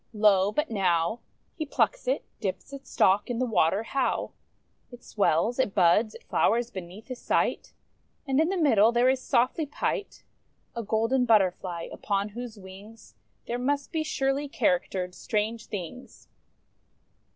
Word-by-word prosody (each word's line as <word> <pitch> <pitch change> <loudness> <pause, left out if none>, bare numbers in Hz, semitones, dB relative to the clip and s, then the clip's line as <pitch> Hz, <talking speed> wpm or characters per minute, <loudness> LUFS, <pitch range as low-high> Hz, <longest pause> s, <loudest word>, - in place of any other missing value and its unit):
Lo! 205 -2 +4
but 300 +4 -1
now 180 0 +1 0.3
He 315 - -4
plucks - - 0
it, - - 0
dips 200 +6 -4
its 275 -1 -10
stalk 195 +4 +3
in 240 - -2
the 255 - +1
water: 210 -3 +2
liowt 270 -1 0 0.6
It 245 0 -13
swells, 210 +4 +1
it 215 -7 0
buds, 205 +4 +3
it - - -12
flowers 235 +2 +1
beneath 190 +2 -9
his 255 -1 -7
sight; - - 0 0.5
And, 270 0 +1
in 320 - +1
the 385 - -1
middle, 230 - +4
there 240 +2 +3
is 260 0 +1
softly 255 +7 +1
pight 345 +7 -3 0.5
A 235 - -2
Golden 230 +4 +1
Butterfly; 185 -6 +1
upon 200 0 -2
whose 235 +1 -8
wings 200 +3 -13 0.3
There 240 +1 -3
must 280 +2 -1
be 320 - -1
surely 280 -2 -1
charactered 195 -12 0
strange 220 +3 -2
things! 205 +6 -8
225 Hz, 150 wpm, -27 LUFS, 200-265 Hz, 0.6 s, Lo